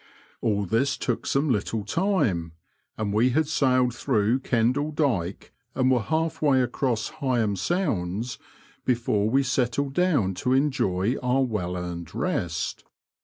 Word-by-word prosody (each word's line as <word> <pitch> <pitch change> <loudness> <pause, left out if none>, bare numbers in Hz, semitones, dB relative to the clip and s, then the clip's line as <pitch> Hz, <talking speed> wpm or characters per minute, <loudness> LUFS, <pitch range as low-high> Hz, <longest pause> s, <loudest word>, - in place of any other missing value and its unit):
All 105 -2 +1
this 130 +8 +1
took 120 - -2
some 140 +3 +1
little 105 -1 -1
time, 105 - 0 0.4
and 105 -2 -2
we 115 +4 +4
had 155 +4 +1
sailed 130 -5 +2
through 115 +1 +1
Kendall 130 +4 +1
Dyke 115 - -1 0.2
and 130 0 +3
were 125 -2 +3
half 160 +6 -1
way 135 -4 +4
across 120 -2 -1
Heigham 120 -7 +1
Sounds 110 - -1 0.4
before 115 -4 +1
we 135 +4 +3
settled 130 +1 0
down 145 - +2
to 125 - +1
enjoy 125 -6 +1
our 125 +2 +2
well 90 -7 -2
earned 85 -2 -6
rest. 85 -1 -2
125 Hz, 135 wpm, -25 LUFS, 105-135 Hz, 0.4 s, we